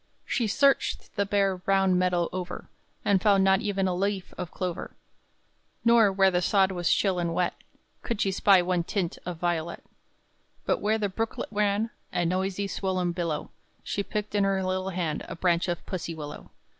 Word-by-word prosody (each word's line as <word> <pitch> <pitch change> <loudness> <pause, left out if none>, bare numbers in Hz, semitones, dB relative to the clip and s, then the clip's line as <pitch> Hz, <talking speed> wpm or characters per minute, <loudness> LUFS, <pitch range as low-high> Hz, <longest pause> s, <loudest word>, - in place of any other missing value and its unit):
She 235 - 0
searched 275 +6 +1
the 200 -2 0
bare 195 -2 +2
brown 190 0 +2
meadow 180 -1 +2
over, 180 -1 -5 0.4
And 195 -2 +3
found 200 -1 +4
not 190 +1 +4
even 200 -3 0
a 185 - 0
leaf 195 +1 -2
of 180 -2 -5
clover; 180 0 -4 0.9
Nor 230 -3 +6
where 195 0 +4
the 180 -1 +1
sod 190 0 +3
was 175 -2 0
chill 190 -3 +2
and 170 -1 -1
wet 180 0 +1 0.5
Could 230 -3 -3
she 195 - +1
spy 190 -1 +5
one 180 -1 0
tint 180 -1 -2
of 175 -2 -4
violet; 170 -1 -2 0.8
But - - +1
where 215 +1 +2
the 210 -2 0
brooklet 225 +4 -3
ran 210 +1 +1 0.2
A 175 - 0
noisy 190 +3 -1
swollen 185 -2 -1
billow, 170 -3 -3 0.3
She 200 - -2
picked 210 +1 -4
in 205 -1 +2
her 195 -1 +1
little 185 0 -1
hand 175 -5 -2
A - - -6
branch 170 0 +1
of 175 -2 -3
pussie 170 -3 -4
willow. 150 -1 -8
190 Hz, 180 wpm, -27 LUFS, 175-200 Hz, 0.9 s, Nor